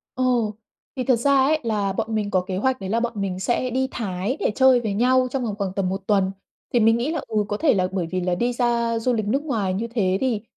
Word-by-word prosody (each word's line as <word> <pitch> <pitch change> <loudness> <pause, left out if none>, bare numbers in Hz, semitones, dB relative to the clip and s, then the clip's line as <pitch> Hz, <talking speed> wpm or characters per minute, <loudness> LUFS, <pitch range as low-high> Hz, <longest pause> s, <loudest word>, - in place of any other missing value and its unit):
Ồ! 245 -4 +1 0.4
Thì 255 - -2
thật 255 0 +3
ra 250 +5 +1
ấy 285 +4 +3
là 205 -4 -1
bọn 220 +2 -2
mình 210 -1 -1
có 185 - +2
kế 185 0 -4
hoạch 260 +5 0
đấy 190 - -4
là 225 +3 +1
bọn 235 0 -2
mình 195 -3 -3
sẽ 240 +5 0
đi 260 +2 0
Thái 200 +4 -3
để - - +1
chơi 260 -2 +5
với 215 -3 -2
nhau 255 +4 +3
trong 265 -1 -2
vòng 215 -4 -2
khoảng 195 -3 -2
tầm 195 -2 -1
1 195 +1 -3
tuần. 195 -3 +2 0.4
Thì 240 - +4
mình 225 +1 +4
nghĩ 250 +6 -1
là, 320 - -2
ừ, 215 -2 0
có 205 - -2
thể 305 +5 +3
là 185 -3 +1
bởi 185 -3 -2
vì 185 0 -1
là 180 0 0
đi 240 +6 0
ra 235 -1 0
du 250 +2 0
lịch 215 -3 -1
nước 275 +7 0
ngoài 220 -11 -1
như 215 +5 -2
thế 195 -6 0
thì 245 -5 0
225 Hz, 275 wpm, -23 LUFS, 195-250 Hz, 0.4 s, chơi